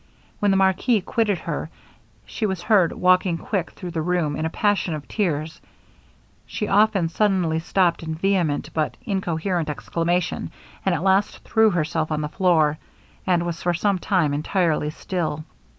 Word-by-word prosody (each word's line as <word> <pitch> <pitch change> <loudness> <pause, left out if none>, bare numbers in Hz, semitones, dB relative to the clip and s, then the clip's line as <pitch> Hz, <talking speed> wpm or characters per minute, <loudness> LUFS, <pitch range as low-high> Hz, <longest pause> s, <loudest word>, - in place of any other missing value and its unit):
When 205 - +2
the 195 - +3
marquis 195 +4 +2
quitted 210 0 0
her, - - -4 0.6
she 220 - -2
was 190 -3 -3
heard 190 -4 +4
walking 180 -1 +2
quick 185 0 -2
through 180 -3 -7
the 165 -1 -2
room, 165 -3 0
in 155 +2 -1
a - - -3
passion 200 -3 0
of 150 - -8
tears; 160 -6 -2 0.9
she 210 - -3
often 205 -3 +3
suddenly 175 -3 +1
stopped 175 +1 +1
in 160 -1 -4
vehement 175 -4 0
but 155 -2 -1
incoherent 180 -4 -1
exclamation; 170 +3 -1 0.3
and 190 -2 +2
at 160 - -3
last 195 +1 +1
threw 220 -1 +3
herself 160 -3 -1
on 150 0 0
the 150 - -3
floor, 155 -3 +2 0.5
and 175 -2 +2
was 170 -1 -4
for 175 0 +1
some 200 +2 +1
time 175 -7 +1
entirely 155 0 0
still. 155 -1 -3
175 Hz, 160 wpm, -23 LUFS, 160-195 Hz, 0.9 s, heard